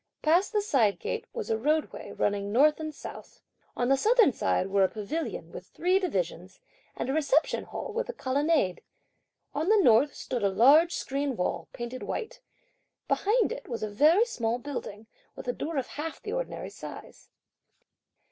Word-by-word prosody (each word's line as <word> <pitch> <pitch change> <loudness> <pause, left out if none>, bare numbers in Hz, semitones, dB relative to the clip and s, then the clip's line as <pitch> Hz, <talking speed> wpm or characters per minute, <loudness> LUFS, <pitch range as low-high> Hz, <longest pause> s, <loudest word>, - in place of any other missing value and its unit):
Past 345 +5 +3
the 420 -2 +1
side 240 - +2
gate, 460 0 -4
was 465 - -4
a 220 - +1
roadway, 305 +5 -1
running 200 0 -1
north 300 +7 +4
and 310 -1 -4
south. 295 - -10 0.4
On 245 - +1
the 270 - +5
southern 435 - +4
side 185 - 0
were 195 0 +2
a 190 - +3
pavilion 215 - -4
with 180 - -9
three 365 +3 +1
divisions 185 - -3 0.4
and - - -3
a 265 - -1
Reception 305 0 +1
Hall - - -6
with 480 +3 -2
a - - -3
colonnade. 280 - 0 0.7
On 310 +6 -1
the 435 - +6
north, 275 - +4
stood 245 - -4
a 200 - +3
large 285 - +5
screen 275 -1 -2
wall, 170 -2 -2
painted 240 +1 -6
white; - - -5 0.7
behind 445 +4 +2
it - - -6
was 235 -4 -4
a 215 - -3
very 315 - +5
small 235 - -2
building, 245 -5 -6 0.3
with - - -9
a 245 - 0
door 310 +4 -4
of 265 - 0
half 310 +4 -6
the 425 - -6
ordinary - - -4
size. - - -11
285 Hz, 175 wpm, -28 LUFS, 225-345 Hz, 0.7 s, the